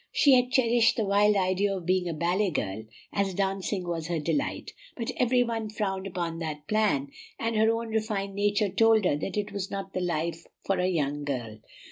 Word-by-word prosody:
She 280 - +5
had 250 -1 +4
cherished 235 -3 +3
the 220 - +1
wild 205 +1 +4
idea 195 +1 +1
of 175 - -8
being 180 0 +1
a - - -2
ballet 180 +5 +1
girl, 110 - -3 0.3
as 195 -2 0
dancing 195 -1 -1
was 165 -2 -3
her 170 -1 -1
delight; 280 - -2 0.2
but 230 -2 -2
every 250 0 +3
one 225 -2 -3
frowned 195 -2 -3
upon 170 -3 -3
that 155 -2 -5
plan, 200 -11 +1 0.3
and 230 0 -2
her 220 +1 +4
own 230 0 -2
refined 215 -3 -2
nature 205 +1 +1
told 220 +1 +4
her 160 - +3
that 195 +7 -4
it 210 0 -2
was 200 -1 -4
not 195 -1 -5
the 185 - -2
life 170 -1 -2 0.2
for 195 - +1
a 180 - +2
young 145 -5 -1
girl. 120 -6 -4
195 Hz, 200 wpm, -27 LUFS, 170-215 Hz, 0.3 s, She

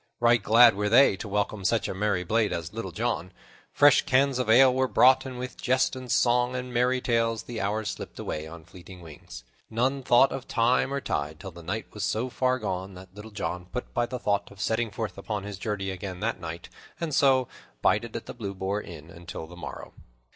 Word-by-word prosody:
Right 120 -1 +4
glad 115 +3 +7
were 105 +1 -1
they 120 -1 +6
to - - -7
welcome 105 0 -2
such 110 +3 +1
a - - -3
merry 95 -1 0
blade 110 +3 +1
as 85 +2 -4
Little 115 +1 -5
John. 110 -6 -2 0.4
Fresh 145 -2 +5
cans 135 0 +3
of 125 -3 -1
ale 130 +3 +7
were 130 0 +1
brought, 130 +1 +5
and 130 -1 -7
with 125 0 -6
jest 130 +1 +1
and 130 -2 -7
song 125 +1 +2
and 125 -1 -5
merry 125 +1 +2
tales 115 -2 0
the 120 -2 -5
hours 105 +2 -1
slipped - - -9
away 75 0 -4
on 80 0 -11
fleeting 90 +1 -13
wings. 75 -6 -11 0.3
None 130 +5 0
thought 125 +1 +4
of 135 - -6
time 125 +3 +2
or 140 0 -2
tide 75 - -3
till 95 -2 -8
the 85 0 -12
night 105 +7 -4
was 105 - -5
so 115 +5 -1
far 130 0 +1
gone 95 -4 -4
that 90 0 -13
Little 105 +2 -10
John 90 -4 -5
put 125 +6 -6
by 120 0 0
the 125 - -4
thought 100 -4 -1
of 100 - -16
setting 110 +3 0
forth 105 -1 -5
upon 105 0 -4
his 100 -1 -7
journey 100 -2 -3
again 95 -1 -6
that 110 -2 -1
night, 85 -1 -7 0.3
and 165 -3 -3
so 130 -2 +4 0.4
bided - - +1
at - - -5
the - - -7
Blue 100 -1 -6
Boar 95 +2 -2
Inn 85 -4 -11
until 85 -1 -8
the 85 +2 -13
morrow. 90 - -8
110 Hz, 220 wpm, -27 LUFS, 95-125 Hz, 0.4 s, glad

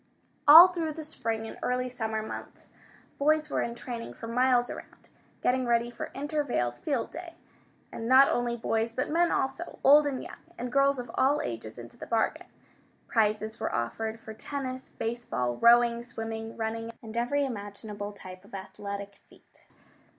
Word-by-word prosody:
All 330 +5 +12
through 330 -3 -3
the 315 +1 -7
spring 225 -7 -3
and - - -9
early 250 0 0
summer 220 -3 -3
months, 220 - -9 0.5
boys 305 +1 +2
were - - +1
in 235 - -3
training 235 -1 -7
for - - -8
miles 245 +1 +3
around, - - -10 0.3
getting 255 0 +2
ready 235 0 +2
for - - -6
Intervale's 280 - -1
Field 275 -6 -2
Day. 335 +1 -8 0.6
And 225 - -5
not 265 +2 +8
only 240 0 0
boys, 225 0 0
but 255 +5 -2
men 340 +2 +3
also, 270 +6 -2
old 290 +2 +7
and 270 -3 -3
young, - - -10 0.2
and 245 +1 -4
girls 275 +1 +3
of 245 -2 -6
all 280 +3 +3
ages 115 -2 -6
into 120 -1 -11
the - - -8
bargain. 225 -1 0 0.6
Prizes 215 0 0
were - - -2
offered 220 - -3
for 220 -1 -9
tennis, 260 +2 -5
baseball, 225 - -3
rowing, 235 - +5
swimming, 225 -1 -6
running, 225 0 -3
and 220 0 -9
every 275 +5 +1
imaginable 205 -3 -6
type 185 -2 -11
of 200 - -11
athletic 200 +1 -7
feat. - - -24
235 Hz, 165 wpm, -29 LUFS, 220-270 Hz, 0.6 s, All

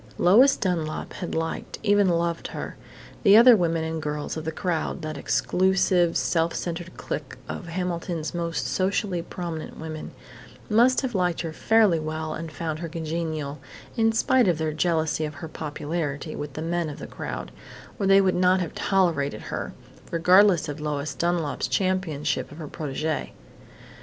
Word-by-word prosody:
Lois 245 +10 +6
Dunlap 165 -5 -2
had 175 - -5
liked, 160 0 -3
even 205 -2 +4
loved 170 -1 0
her. - - -6 0.5
The 200 +1 +7
other 240 +1 +9
women 165 -4 +1
and 160 0 -3
girls 150 -1 -3
of 160 0 -5
"the 160 - -1
crowd" 170 0 -2
that 155 0 -4
exclusive, 185 +3 +2
self 165 0 +1
centered 175 +1 -5
clique - - -5
of 175 - -6
Hamilton's 170 -2 -3
most 170 -1 -2
socially 190 -1 0
prominent 165 -2 -6
women 155 -1 -6 0.6
must 245 +4 +5
have 260 -3 -3
liked 180 -3 +1
her 165 -2 -4
fairly 215 -3 +4
well 155 0 -3
and 165 0 -6
found 155 +1 -4
her 170 -1 -5
congenial, 155 -3 -3 0.4
in 225 -1 +3
spite 240 +1 +3
of 175 -3 +2
their 155 -1 -1
jealousy 160 -1 +1
of 150 -1 -4
her 150 +3 -7
popularity 155 0 -4
with 145 -2 -6
the 155 - -5
men 170 -1 -1
of 145 - -7
the - - -7
crowd, - - -6 0.5
or 195 - +1
they 195 0 +7
would 190 -1 +2
not 185 +1 +3
have 175 -3 -3
tolerated 165 - +1
her, - - -3 0.4
regardless 180 0 +5
of 145 +1 -5
Lois 150 0 -2
Dunlap's 170 -4 -1
championship 185 -9 -1
of 145 - -11
her 160 -3 -6
protegée. 155 +1 -3
170 Hz, 160 wpm, -25 LUFS, 155-185 Hz, 0.6 s, other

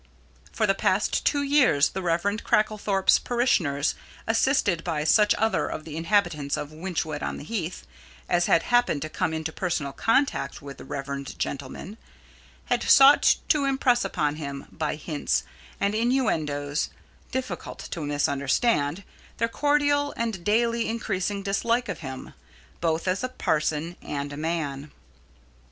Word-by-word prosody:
For 220 - 0
the 195 - +3
past 195 +1 +1
two 285 -1 +2
years 275 - +4
the 190 - -5
Rev. 170 -1 0 0.2
Cracklethorpe's 210 -2 +2
parishioners, 175 - +1 0.3
assisted 225 - +2
by 160 -4 -1
such 210 +7 +4
other 220 0 +1
of 155 - -6
the 155 -2 -7
inhabitants 165 -5 +1
of 145 - -5
Wychwood 160 -2 -3
on - - -3
the - - -8
Heath 175 -1 -4 0.4
as 175 0 +2
had 165 - +4
happened 240 - +2
to 155 - -5
come 160 - -1
into 160 0 -3
personal 160 -6 -2
contact 270 +5 +1
with 140 -1 -10
the - - -10
reverend 140 0 -5
gentleman, 145 - -5 0.7
had - - 0
sought 275 +1 +7
to 295 -3 +3
impress 265 -3 +2
upon 150 -3 -1
him, 140 -3 -6
by 155 -1 -2
hints 145 - -1 0.4
and 200 +1 +1
innuendoes 155 - 0 0.4
difficult 255 -9 -4
to 170 - -4
misunderstand, 145 - 0 0.3
their 230 - +1
cordial 290 +2 +1
and 225 -6 -2
daily 230 +3 +1
increasing 200 -3 -2
dislike 230 +5 0
of - - -4
him, 130 -4 -8 0.5
both 165 +1 -1
as 185 +6 0
a 255 - -1
parson 160 -6 -1
and 145 0 -4
a - - -7
man. 150 -3 -3
175 Hz, 140 wpm, -26 LUFS, 150-230 Hz, 0.7 s, sought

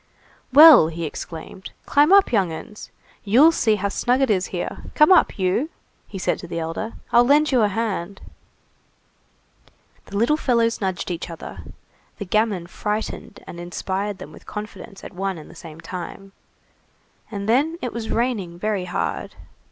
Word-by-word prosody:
"Well!" 290 - +9
he 165 +1 -5
exclaimed, 165 +4 -8 0.2
"climb 295 +4 +3
up, 395 0 +6
young 195 -7 +2
'uns! 210 +6 -9 0.3
You'll 255 +11 +6
see 220 -9 +2
how 200 0 -2
snug 245 +5 +1
it 270 -4 +2
is 190 -2 +1
here! - - -5
Come 300 +4 +5
up, 365 - +4
you!" 190 - 0 0.4
he 200 - -8
said 185 - -1
to 175 - -9
the 170 - -5
elder, 165 +7 -4 0.2
"I'll 240 0 +6
lend 295 +4 +3
you 250 -3 +3
a 210 - +4
hand." 200 -3 -3 1.9
The 200 - -5
little 240 +8 +2
fellows 230 -6 +1
nudged 190 -2 -2
each 175 0 -5
other, 165 - -9 0.6
the 205 - -5
gamin 205 -2 0
frightened 210 +3 -5
and 170 - -9
inspired 190 +3 -4
them - - -10
with - - -16
confidence 210 -1 -8
at - - -9
one 190 0 -3
and 155 - -12
the - - -14
same 160 -2 -11
time, 185 +3 -8 1.0
and 200 -2 -5
then, 290 +9 +2
it 250 -7 -4
was 230 -1 -5
raining 220 -8 -1
very 205 -1 -2
hard. - - -3
205 Hz, 165 wpm, -22 LUFS, 180-240 Hz, 1.9 s, Well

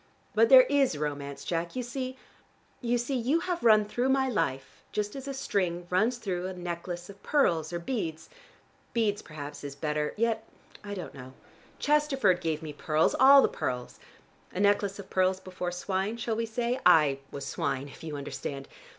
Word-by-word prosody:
But 460 - +4
there - - +10
is 275 - +2
romance, 140 -1 -4
Jack. 170 +3 -2
You 255 - -2
see 255 +1 -5 0.6
you 240 -1 +1
see 240 +3 -2
you 260 +7 +1
have 355 -1 -3
run 215 -2 +6
through 240 +5 -1
my 265 0 +3
life 135 - -2
just 210 +2 -2
as 270 0 -7
a 275 - -3
string 180 -9 -1
runs 220 +7 +2
through 185 -5 -3
a 190 - -5
necklace 175 0 -5
of 200 0 -13
pearls 170 - +2
or 175 - -2
beads: 170 -4 -4 0.7
beads 215 -3 +1
perhaps 150 -2 -8
is 140 -1 -6
better 150 +1 -2
yet 225 0 +1 0.4
I 205 0 -5
don't 180 - -7
know. 130 -1 -10 0.4
Chesterford 270 - +2
gave 160 -2 -2
me 155 -2 -6
pearls, 155 +2 +1
all 275 +1 +9
the - - +5
pearls. 125 -1 -4 0.5
A - - -5
necklace 200 -1 +2
of 200 -2 -10
pearls 185 0 +2
before 185 -1 -5
swine 190 +4 -2
shall 230 -1 -2
we 230 +1 -1
say? 240 +3 -1
I 145 -4 +5
was 140 -1 -6
swine, 140 -3 -2
if 140 - -13
you 155 -2 -5
understand. 140 0 -5
190 Hz, 180 wpm, -29 LUFS, 155-240 Hz, 0.7 s, there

